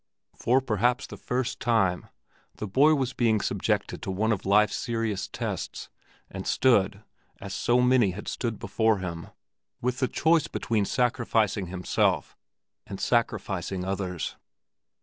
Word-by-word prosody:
For 130 +3 +2
perhaps 120 0 +1
the - - -9
first 125 0 -2
time, 95 -7 +1 0.5
the - - -5
boy 140 +10 +4
was 130 -2 -1
being 115 -4 +2
subjected - - -1
to - - -5
one 105 +4 0
of 100 -3 -2
life's 105 +2 +4
serious 115 -4 -2
tests, - - -5 0.4
and - - -7
stood—as 100 -3 0
so 120 +4 +2
many 125 -4 +4
had 95 +3 -7
stood 115 -3 -3
before 110 0 +1
him—with 95 +7 -6
the 130 - +2
choice 160 +2 +2
between 110 -3 -1
sacrificing 115 -5 +1
himself 90 0 0 0.5
and 95 - -7
sacrificing 95 -5 -1
others. 95 -3 -3
110 Hz, 130 wpm, -27 LUFS, 95-125 Hz, 0.5 s, boy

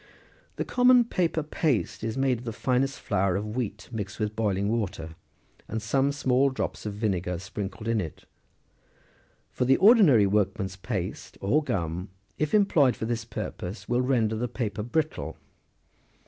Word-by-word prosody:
The - - -2
common 250 -1 +5
paper 170 -7 0
paste 145 - -1
is 110 +2 -2
made 135 -3 +1
of - - -11
the 115 - -3
finest 130 +4 0
flour 95 -3 0
of 105 +2 -3
wheat 105 -5 -3
mixed 105 -3 -5
with 105 -1 -2
boiling 100 -3 0
water, 100 -8 -2 0.5
and 110 - -3
some 135 +6 +1
small 135 -1 +2
drops 130 -4 -4
of 105 - -4
vinegar 95 -4 -1
sprinkled 100 +3 -6
in 115 -2 +1
it: 80 -4 -8 1.3
for - - -1
the 130 +1 +5
ordinary 190 - +7
workman's 100 -1 0
paste, 95 -2 -5
or 130 +11 +2
gum, 90 - -2 0.3
if 155 +5 +1
employed 160 -11 +4
for - - -4
this 115 0 -2
purpose, 100 -2 -6
will 120 +1 +2
render 120 -4 +1
the 120 +3 -1
paper 110 -4 -3
brittle. 125 - -2
110 Hz, 155 wpm, -27 LUFS, 100-135 Hz, 1.3 s, ordinary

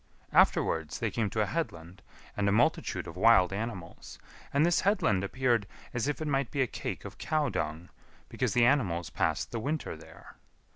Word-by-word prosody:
Afterwards 80 -2 +3
they 115 -3 -2
came 110 -3 -1
to 110 +2 -1
a - - +2
headland 90 - -4 0.3
and 100 -1 +1
a - - +2
multitude 115 +4 +1
of 80 - -9
wild 95 -2 +5
animals; 100 -5 -6 0.3
and 140 +3 +3
this 175 0 +3
headland 105 - +2
appeared 120 -1 +1 0.3
as 120 +2 -1
if 145 -3 -1
it 155 - -3
might 135 -3 0
be 140 -2 +1
a - - +1
cake - - -5
of - - -9
cow 155 -3 0
dung, 80 +3 -4 0.4
because - - -2
the 120 -1 +5
animals 90 - +1
passed 75 - -1
the 115 - -3
winter 145 +7 -3
there. - - -15
115 Hz, 185 wpm, -30 LUFS, 90-135 Hz, 0.4 s, wild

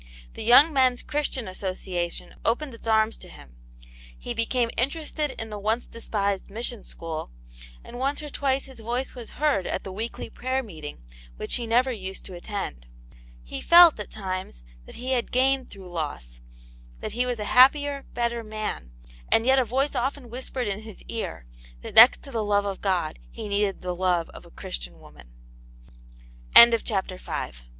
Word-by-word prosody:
The - - -7
Young 275 +8 +7
Men's 255 -2 +3
Christian 290 -6 -2
Association 185 -2 -3
opened 255 +4 0
its 230 - -10
arms 220 0 +2
to - - -10
him; 65 -4 -14 0.6
he - - -5
became 230 +1 0
interested 295 +2 -2
in 225 -1 -5
the 210 - -5
once 220 +4 0
despised 200 -4 -2
Mission 230 +2 -4
School, 160 - -6 0.5
and 245 - -9
once 275 +2 0
or 295 - -6
twice 270 -1 0
his 265 -3 -12
voice 240 +4 -3
was 240 -3 -10
heard 290 -11 +1
at - - -3
the 190 - -7
weekly 220 +5 -5
prayer 260 +1 -2
meeting, 155 - -9 0.3
which - - -2
he 235 -2 -4
never 250 +3 +3
used 190 -4 -6
to 190 - -7
attend. 175 - -6 0.6
He - - -6
felt, 340 -6 +8
at 210 - -5
times, 185 - -5 0.2
that - - -12
he 255 +2 -3
had 245 -2 0
gained 265 +1 +2
through 190 -3 -11
loss: 65 - -5 0.6
that - - -4
he 250 +2 0
was 245 -1 -1
a 210 - -4
happier, 280 +2 +5
better 235 -1 -1
man; 215 - -5 0.4
and 225 - +4
yet 265 +1 +5
a - - +3
voice 265 +5 0
often 255 -1 -2
whispered 255 -1 -4
in 200 0 -2
his 220 -2 -11
ear, 225 - -4 0.4
that - - -8
next 235 +3 +8
to 275 - -10
the 225 -3 -1
love 205 -1 +2
of 195 -1 -4
God 180 -6 -1
he 225 -2 -7
needed 200 -1 -1
the 180 0 -2
love 175 -2 0
of - - -13
a - - -16
Christian - - -6
woman, 60 -1 -16 1.5
CHAPTER 190 -4 -2
VI. - - -4
225 Hz, 175 wpm, -26 LUFS, 190-255 Hz, 1.5 s, felt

